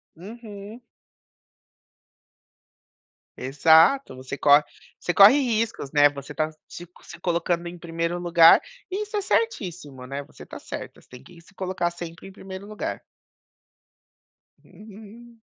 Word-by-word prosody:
Uhum. 210 +3 -11 2.6
Exato, 160 - +3
você 130 +2 -7
cor 145 +1 +5 0.3
você 175 - -3
corre 205 +8 +8
riscos, 230 - -2
né, 145 -1 +5
você 140 +1 -10
tá 155 0 -1 0.2
se 175 0 -10
se 175 - -13
colocando 170 0 -1
em 175 +1 -8
1º 170 +1 -3
lugar 170 -1 +6 0.3
e 395 +3 -3
isso 425 0 -5
é - - 0
certíssimo, 175 - -3
né, 140 +1 -5
você - - -15
tá - - -10
certa, - - -9
você - - -27
tem 125 - -12
que 175 -2 -17
se 195 - -23
colocar 185 -2 -2
sempre 170 +1 -9
em - - -11
1º 190 0 -10
lugar. 210 0 -5 1.6
Uhum. 220 +3 -15
175 Hz, 130 wpm, -24 LUFS, 160-215 Hz, 2.6 s, corre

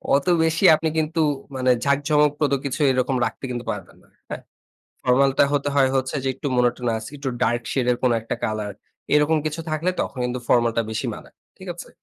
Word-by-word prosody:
অত 140 - 0 0.2
বেশি 160 0 0
আপনি 160 +1 -1
কিন্তু 160 +1 0 0.3
মানে 130 -1 +2
ঝাঁক 140 0 +2
ঝমকপ্রদ 150 -1 +2
কিছু 135 - -3
এরকম 130 +1 0
রাখতে - - -6
কিন্তু 120 -1 -5
পারবেন - - -8
না, - - -25 0.2
হ্যাঁ। - - -5 0.6
ফরমাল 135 +2 +4
টা - - +7
হতে 145 0 0
হয় 135 -2 +4
হচ্ছে 130 +1 -1
যে, 135 - 0
একটু 145 - -6
মনটোনাস 120 -2 0
একটু 140 -1 -4
ডার্ক 120 0 +1
শেড 130 -3 0
এর 120 - +2
কোন 125 - +3
একটা 115 - -4
কালার 105 -1 -3 0.4
এরকম 150 +2 +3
কিছু 155 +2 -3
থাকলে 155 +4 0
তখন 135 - -4
কিন্তু 125 +1 -2
ফর্মাল 120 -1 +3
টা 115 - +3
বেশি 110 - -3
মানায়। - - -13 0.2
ঠিক - - -11
আছে? - - -10
135 Hz, 200 wpm, -23 LUFS, 125-150 Hz, 0.6 s, টা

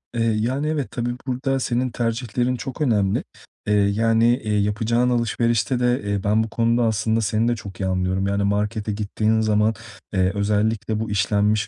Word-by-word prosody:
Eee, 115 - 0 0.2
yani, 130 +7 -1
evet, 155 -4 -2
tabii, 120 0 -2 0.2
burada 135 +1 -1
senin 125 0 0
tercihlerin 120 +1 -1
çok 130 +3 -6
önemli. 105 -8 +1 0.4
Eee, 105 - +2
yani, 110 +3 +3 0.2
eee, 105 -1 0
yapacağın 110 +4 +1
alışverişte 120 0 +1
de, 125 0 +1
eee, 100 -1 -2
ben 105 +2 +2
bu 110 - -5
konuda 115 +2 +1
aslında 110 0 +1
seni 110 +2 +1
de 120 - +1
çok 100 -5 -10
iyi 95 - -1
anlıyorum. 95 +1 0
Yani, 100 0 0
markete 105 +2 -1
gittiğin 110 +1 0
zaman, 110 0 +2 0.4
eee, 95 0 +2
özellikle 105 +2 0
bu 110 -1 -3
işlenmiş 105 +1 +1
110 Hz, 170 wpm, -22 LUFS, 105-120 Hz, 0.4 s, yani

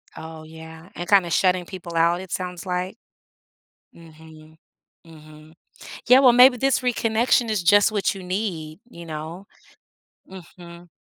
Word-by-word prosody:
Oh, 160 0 -10
yeah, 160 +2 -13
and 175 - -7
kinda 190 -4 +4
shutting 180 0 +1
people 175 -2 -10
out, 170 +2 +1
it 190 - -12
sounds 180 0 -5
like. 180 +3 -4 1.0
Mhm. 160 -1 -17 0.5
Mhm. 155 -1 -16 0.5
Yeah, 255 +2 +6
well, 255 -3 +6
maybe 250 +1 +6
this 270 +2 0
reconnection 235 -1 0
is 205 -5 -1
just 205 +5 +4
what 205 -1 -1
you 190 - -10
need, 180 -3 -5
you 170 -7 -12
know? 160 +4 -8 0.8
Mhm. 175 -1 -14
175 Hz, 135 wpm, -22 LUFS, 160-200 Hz, 1.0 s, Yeah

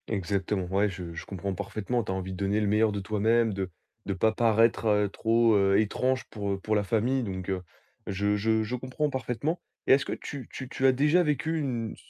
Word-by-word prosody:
Exactement. 100 -1 -1
Ouais, 100 +3 +1
je 90 -3 -7
je 85 - -7
comprends 100 0 -4
parfaitement. 110 +6 -2
Tu - - -4
as - - -1
envie 95 0 -4
de - - -7
donner 100 +2 0
le 105 - 0
meilleur 105 +1 +3
de 100 - -3
toi-même, 110 +3 +2
de 95 -1 -3 0.4
de 100 - 0
pas 110 +4 +2
paraître 110 -2 +3
trop, 115 0 +3
heu, 100 -1 +4
étrange 130 +5 0
pour 100 -2 -3
pour 110 +2 -1
la 105 - +2
famille, 120 +6 +1
donc 95 -3 -5
heu, 95 -1 -1 0.5
je 100 +1 0
je 110 +1 +1
je 115 +4 -3
comprends 130 +4 -2
parfaitement. 130 +5 -2 0.3
Et - - +7
est-ce 135 - +3
que - - -3
tu 135 -5 -7
tu 130 - -6
tu 135 - +1
as - - +7
déjà 150 +7 +3
vécu 160 0 0
une 120 -6 -3
110 Hz, 215 wpm, -28 LUFS, 100-125 Hz, 0.5 s, Et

